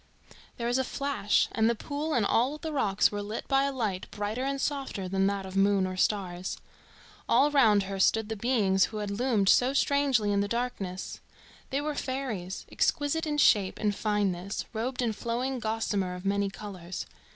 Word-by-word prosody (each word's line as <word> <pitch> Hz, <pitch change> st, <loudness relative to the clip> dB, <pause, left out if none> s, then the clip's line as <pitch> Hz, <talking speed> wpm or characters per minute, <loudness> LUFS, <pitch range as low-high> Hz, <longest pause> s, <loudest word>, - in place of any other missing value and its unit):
There 235 Hz, -, -3 dB
was 245 Hz, +2 st, +1 dB
a -, -, +2 dB
flash, 275 Hz, -6 st, 0 dB
and 220 Hz, 0 st, +2 dB
the 235 Hz, -, +1 dB
pool 295 Hz, +6 st, -3 dB
and 230 Hz, -4 st, +2 dB
all 255 Hz, +8 st, +2 dB
the 315 Hz, 0 st, -5 dB
rocks 205 Hz, -8 st, +2 dB
were 205 Hz, 0 st, -3 dB
lit 210 Hz, +2 st, -5 dB
by 275 Hz, 0 st, +3 dB
a 280 Hz, -, 0 dB
light 215 Hz, -8 st, -3 dB
brighter 210 Hz, +4 st, -3 dB
and 275 Hz, 0 st, -1 dB
softer 270 Hz, -10 st, -2 dB
than 195 Hz, +1 st, +1 dB
that 200 Hz, -1 st, -2 dB
of 190 Hz, 0 st, -8 dB
moon 195 Hz, -1 st, +3 dB
or 185 Hz, 0 st, -4 dB
stars. 185 Hz, -2 st, -1 dB, 0.7 s
All 290 Hz, +2 st, +4 dB
round 220 Hz, -8 st, +5 dB
her 195 Hz, 0 st, -5 dB
stood 220 Hz, +3 st, +3 dB
the 220 Hz, -, -3 dB
beings 200 Hz, -4 st, +2 dB
who 220 Hz, -, -7 dB
had 205 Hz, -1 st, -3 dB
loomed 215 Hz, -2 st, +1 dB
so 250 Hz, +6 st, +5 dB
strangely 275 Hz, -7 st, +2 dB
in 200 Hz, 0 st, +2 dB
the 200 Hz, -, 0 dB
darkness. 205 Hz, -5 st, -3 dB, 0.5 s
They 275 Hz, +2 st, -1 dB
were 300 Hz, 0 st, -2 dB
fairies, 255 Hz, -10 st, -4 dB
exquisite 305 Hz, +3 st, 0 dB
in 295 Hz, -1 st, -1 dB
shape 205 Hz, -9 st, +4 dB
and 210 Hz, -1 st, 0 dB
fineness, 200 Hz, -3 st, -1 dB
robed 245 Hz, +3 st, -2 dB
in 225 Hz, -2 st, 0 dB
flowing 245 Hz, +4 st, -2 dB
gossamer 215 Hz, -4 st, -1 dB
of 180 Hz, +1 st, -9 dB
many 200 Hz, 0 st, +1 dB
colours. 185 Hz, -2 st, -7 dB
215 Hz, 185 wpm, -28 LUFS, 195-265 Hz, 0.7 s, round